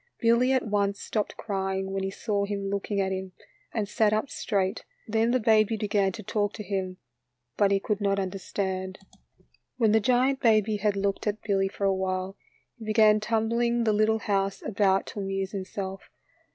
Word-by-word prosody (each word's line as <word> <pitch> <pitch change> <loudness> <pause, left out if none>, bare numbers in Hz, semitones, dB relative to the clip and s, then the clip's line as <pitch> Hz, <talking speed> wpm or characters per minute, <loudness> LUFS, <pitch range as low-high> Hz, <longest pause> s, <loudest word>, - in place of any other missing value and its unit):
Billy 235 +3 +3
at 260 -1 +2
once 200 -1 0
stopped 210 -2 -3
crying 190 -2 -2
when 195 0 -2
he 190 - -1
saw 200 +1 -1
him 200 -1 -3
looking 200 0 -2
at 190 -1 0
him, 190 -1 -4 0.4
and 215 -3 -2
sat 215 0 +2
up 215 +6 -1
straight. 195 -1 -1 0.2
Then 225 +1 +2
the 255 +1 +2
baby 220 -1 +3
began 205 -2 +1
to 220 - -8
talk 205 +1 -1
to 210 - -6
him, 190 -2 -3 0.6
but 200 -1 +3
he 200 0 +2
could 210 +1 -2
not 200 -1 +1
understand. 190 0 -3 0.8
When 225 -4 +3
the 220 - +5
giant 255 +4 +2
baby 215 -2 +3
had 205 0 0
looked 200 +1 -1
at 210 +1 -2
Billy 195 -2 +1
for 200 +1 -7
awhile, 190 0 -1 0.4
he 225 - -8
began 215 0 +5
tumbling; 235 +2 +1
the 220 -2 +2
little 215 +1 +3
house 195 -2 -1
about 195 -2 +2
to - - -7
amuse 195 -1 -2
himself. 195 -1 -5
205 Hz, 180 wpm, -27 LUFS, 195-220 Hz, 0.8 s, the